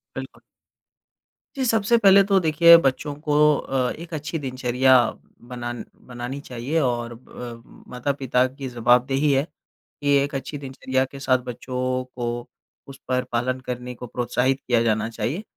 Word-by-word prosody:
बिल्कुल। -, -, -8 dB, 1.2 s
जी 265 Hz, -, -1 dB
सबसे 225 Hz, -1 st, +3 dB
पहले 200 Hz, -2 st, +7 dB
तो 195 Hz, -1 st, +3 dB
देखिए 170 Hz, +1 st, +7 dB
बच्चों 140 Hz, +2 st, -1 dB
को 150 Hz, -1 st, -2 dB, 0.2 s
अ, 130 Hz, -3 st, -1 dB
एक 170 Hz, +1 st, -11 dB
अच्छी 155 Hz, +2 st, -4 dB
दिनचर्या 130 Hz, -1 st, +2 dB, 0.5 s
बनान 120 Hz, -1 st, -5 dB, 0.2 s
बनानी 125 Hz, +3 st, -6 dB
चाहिए 130 Hz, +5 st, -3 dB
और 120 Hz, -3 st, -1 dB
अ, 120 Hz, 0 st, -10 dB, 0.3 s
माता-पिता 130 Hz, 0 st, 0 dB
की 135 Hz, 0 st, -7 dB
जवाबदेही 125 Hz, +4 st, +2 dB
है 135 Hz, 0 st, +3 dB, 0.6 s
कि 145 Hz, 0 st, +2 dB
एक 145 Hz, 0 st, -6 dB
अच्छी 140 Hz, +2 st, -4 dB
दिनचर्या 130 Hz, -1 st, -2 dB
के 135 Hz, +1 st, -10 dB
साथ 130 Hz, -2 st, +2 dB
बच्चों 130 Hz, +1 st, -3 dB
को 120 Hz, 0 st, -4 dB, 0.4 s
उस 135 Hz, -, -11 dB
पर 125 Hz, 0 st, 0 dB
पालन 125 Hz, +2 st, -1 dB
करने 125 Hz, 0 st, -5 dB
को 125 Hz, -, -9 dB
प्रोत्साहित 125 Hz, +3 st, 0 dB
किया 120 Hz, -3 st, +1 dB
जाना 110 Hz, -1 st, 0 dB
चाहिए। 140 Hz, -, -3 dB
130 Hz, 145 wpm, -23 LUFS, 125-145 Hz, 1.2 s, पहले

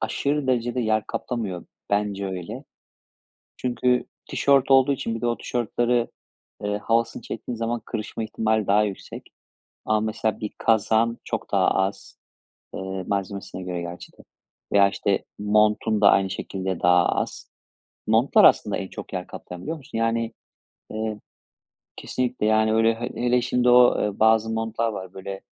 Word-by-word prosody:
aşırı 145 Hz, -1 st, -1 dB
derecede 120 Hz, 0 st, 0 dB
yer 110 Hz, -1 st, +1 dB
kaplamıyor. 105 Hz, -8 st, -4 dB, 0.3 s
Bence 100 Hz, -1 st, 0 dB
öyle. 90 Hz, -3 st, -6 dB, 0.9 s
Çünkü 125 Hz, 0 st, +1 dB, 0.3 s
tişört 140 Hz, -1 st, +3 dB
olduğu 135 Hz, +1 st, +6 dB
için 115 Hz, -4 st, -3 dB
bir 115 Hz, -, -5 dB
de 120 Hz, -, -1 dB
o 120 Hz, 0 st, 0 dB
tişörtlerin, 120 Hz, 0 st, 0 dB, 0.6 s
eee, 105 Hz, 0 st, -1 dB
havasını 115 Hz, +2 st, 0 dB
çektiğin 115 Hz, +2 st, -6 dB
zaman 115 Hz, +1 st, -2 dB
kırışma 110 Hz, 0 st, -4 dB
ihtimali 110 Hz, -1 st, 0 dB
daha 105 Hz, +2 st, +4 dB
yüksek. 100 Hz, -2 st, -6 dB, 0.6 s
Ama 110 Hz, 0 st, +2 dB
mesela 110 Hz, 0 st, -1 dB
bir 105 Hz, -, -4 dB
kazağın 115 Hz, +1 st, +2 dB
çok -, -, -4 dB
daha -, -, +3 dB
az 95 Hz, +1 st, -1 dB, 0.6 s
Eee, 95 Hz, 0 st, -4 dB
malzemesine 100 Hz, -1 st, -4 dB
göre 90 Hz, -1 st, -4 dB
gerçi 85 Hz, +1 st, -8 dB
de -, -, -28 dB, 0.6 s
veya, 100 Hz, -1 st, +6 dB
işte, 100 Hz, 0 st, -1 dB
montun 105 Hz, +1 st, +2 dB
da 105 Hz, -, +7 dB
aynı 95 Hz, -1 st, +2 dB
şekilde 95 Hz, -1 st, -4 dB
daha 90 Hz, 0 st, +4 dB
az. -, -, -3 dB, 0.6 s
Montlar 110 Hz, +5 st, +4 dB
aslında 105 Hz, -, +5 dB
en 95 Hz, -, -5 dB
çok -, -, -9 dB
yer 90 Hz, -1 st, -4 dB
kaplayan 90 Hz, 0 st, -9 dB
biliyor 160 Hz, +1 st, -4 dB
musun? 135 Hz, -4 st, -8 dB
Yani, 115 Hz, 0 st, 0 dB, 0.6 s
eee 110 Hz, -1 st, -3 dB, 0.8 s
Kesinlikle, 125 Hz, -3 st, -2 dB
yani, 110 Hz, 0 st, +3 dB
öyle. 115 Hz, 0 st, +3 dB
He 120 Hz, +2 st, -4 dB
hele 125 Hz, 0 st, +2 dB
şimdi 125 Hz, 0 st, +1 dB
o, 125 Hz, 0 st, +6 dB
eee, 105 Hz, -1 st, -2 dB
bazı 110 Hz, 0 st, +4 dB
montlar 115 Hz, +1 st, -1 dB
var 95 Hz, -3 st, -7 dB
böyle, 95 Hz, 0 st, -7 dB
110 Hz, 150 wpm, -24 LUFS, 100-120 Hz, 0.9 s, da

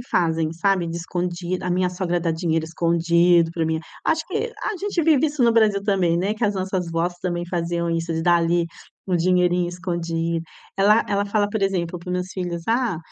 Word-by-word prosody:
fazem, 160 Hz, -2 st, +1 dB
sabe, 180 Hz, +1 st, +1 dB
de 165 Hz, -, -4 dB
escondi 175 Hz, +1 st, -3 dB
a 180 Hz, -, -2 dB
minha 180 Hz, 0 st, +2 dB
sogra 175 Hz, -1 st, -1 dB
dá 165 Hz, -1 st, 0 dB
dinheiro 160 Hz, -1 st, 0 dB
escondido 170 Hz, 0 st, +3 dB
para 165 Hz, -2 st, -1 dB
mim 160 Hz, 0 st, -1 dB, 0.3 s
acho 320 Hz, 0 st, +1 dB
que 445 Hz, +4 st, -2 dB
a 425 Hz, -, -2 dB
gente 390 Hz, -3 st, -1 dB
vive 310 Hz, -2 st, +4 dB
isso 290 Hz, -3 st, -1 dB
no 235 Hz, -, +5 dB
Brasil 215 Hz, -3 st, +3 dB
também, 180 Hz, -5 st, +2 dB
né, 200 Hz, +4 st, 0 dB
que 220 Hz, -, -2 dB
as 205 Hz, -1 st, +1 dB
nossas 185 Hz, -2 st, -2 dB
vós 170 Hz, +2 st, -1 dB
também 175 Hz, -1 st, -2 dB
faziam 170 Hz, -1 st, -1 dB
isso 165 Hz, 0 st, -1 dB
de 160 Hz, -, -1 dB
dar 175 Hz, 0 st, +4 dB
ali 170 Hz, 0 st, +1 dB, 0.4 s
um 180 Hz, -, +2 dB
dinheirinho 180 Hz, 0 st, +2 dB
escondido. 170 Hz, -2 st, -2 dB, 0.3 s
Ela 210 Hz, +3 st, +5 dB
ela 200 Hz, 0 st, +1 dB
fala, 205 Hz, 0 st, +1 dB
por 210 Hz, -1 st, -2 dB
exemplo, 180 Hz, -3 st, -1 dB
para 170 Hz, -, -12 dB
os -, -, -1 dB
meus 180 Hz, 0 st, -2 dB
filhos: 175 Hz, -2 st, -4 dB
"Ah, 230 Hz, -7 st, +1 dB
175 Hz, 205 wpm, -22 LUFS, 170-195 Hz, 0.4 s, no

